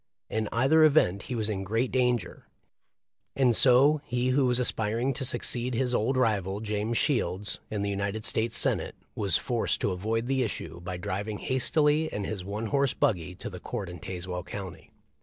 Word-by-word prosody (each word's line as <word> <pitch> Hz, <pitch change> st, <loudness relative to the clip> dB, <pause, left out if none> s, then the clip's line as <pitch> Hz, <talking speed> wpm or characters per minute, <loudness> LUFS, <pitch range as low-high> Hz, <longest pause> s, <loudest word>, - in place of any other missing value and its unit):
In 110 Hz, -1 st, -1 dB
either 135 Hz, +7 st, +4 dB
event 140 Hz, -, +4 dB
he 125 Hz, -, -2 dB
was 110 Hz, -2 st, 0 dB
in 100 Hz, -3 st, -2 dB
great 115 Hz, +6 st, 0 dB
dan 125 Hz, -1 st, +3 dB
ger; 90 Hz, -6 st, -11 dB, 0.9 s
and 125 Hz, -4 st, +3 dB
so 140 Hz, +5 st, +5 dB
he 125 Hz, 0 st, -1 dB
who 130 Hz, 0 st, +3 dB
was 125 Hz, -1 st, +2 dB
aspiring 120 Hz, +1 st, 0 dB
to 130 Hz, -, -4 dB
succeed 120 Hz, 0 st, 0 dB
his 125 Hz, 0 st, 0 dB
old 125 Hz, +3 st, +1 dB
rival, 100 Hz, -5 st, +1 dB
James 105 Hz, +1 st, -2 dB
Shields, 105 Hz, -, 0 dB
in 105 Hz, -2 st, -2 dB
the 100 Hz, -, -1 dB
United 100 Hz, +2 st, -3 dB
States 115 Hz, +2 st, +1 dB
Senate -, -, 0 dB, 0.2 s
was 100 Hz, -5 st, +2 dB
forced 120 Hz, -3 st, -1 dB
to 100 Hz, -, +1 dB
avoid 110 Hz, +5 st, -1 dB
the 135 Hz, +1 st, 0 dB
issue 105 Hz, -7 st, -4 dB
by 90 Hz, 0 st, -5 dB
driving 100 Hz, +4 st, -3 dB
hastily 150 Hz, +6 st, +2 dB
in 105 Hz, -, -3 dB
his 100 Hz, -2 st, -4 dB
one 105 Hz, +4 st, -4 dB
horse 140 Hz, +3 st, +1 dB
buggy 90 Hz, -2 st, 0 dB
to -, -, -7 dB
the 90 Hz, -, -8 dB
court 105 Hz, -7 st, -5 dB
in 90 Hz, -1 st, -8 dB
Tazewell 90 Hz, +1 st, -5 dB
county. 95 Hz, 0 st, -8 dB
110 Hz, 185 wpm, -28 LUFS, 100-125 Hz, 0.9 s, so